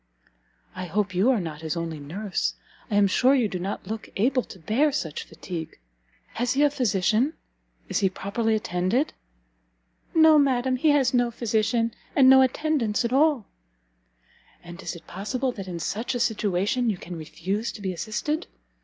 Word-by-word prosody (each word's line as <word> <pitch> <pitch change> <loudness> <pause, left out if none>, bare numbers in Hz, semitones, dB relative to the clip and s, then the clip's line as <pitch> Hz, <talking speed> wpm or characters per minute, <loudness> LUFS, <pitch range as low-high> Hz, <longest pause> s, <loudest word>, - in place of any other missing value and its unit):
"I 185 0 -5
hope 190 +2 -1
you 190 +7 +3
are 255 -4 +3
not 160 -4 -6
his 160 +1 -3
only 165 -2 -4
nurse? 185 +8 -3 0.3
I 210 - -1
am 205 0 +5
sure 255 +8 +4
you 245 -5 +2
do 185 -3 -4
not 195 +3 -4
look 220 0 -6
able 255 +5 +2
to 195 - -12
bear 230 - +1
such 160 - -3
fatigue. 165 -4 -7 0.6
Has 245 +2 0
he 280 +2 +3
a 290 - +4
physician? 230 - +1 0.5
Is - - 0
he 195 -2 +3
properly 220 +4 -1
attended?" 215 - 0 1.0
"No, 315 -1 +7
madam; 260 -2 +2
he 310 +5 +3
has 275 -3 +3
no 245 -1 +3
physician, 230 0 0 0.2
and 265 -2 +6
no 265 0 +8
attendance 260 -4 +1
at 235 - -1
all!" 285 -5 +3 1.2
"And 175 +2 -10
is - - -5
it 170 - -12
possible 250 +8 -2
that 195 -5 -8
in 175 -2 -5
such 225 +9 -2
a - - -1
situation 215 +2 +1
you 205 - -1
can 175 0 -8
refuse 180 +7 -3
to 215 - -10
be 190 -1 -1
assisted? 235 - -3
220 Hz, 170 wpm, -25 LUFS, 185-255 Hz, 1.2 s, no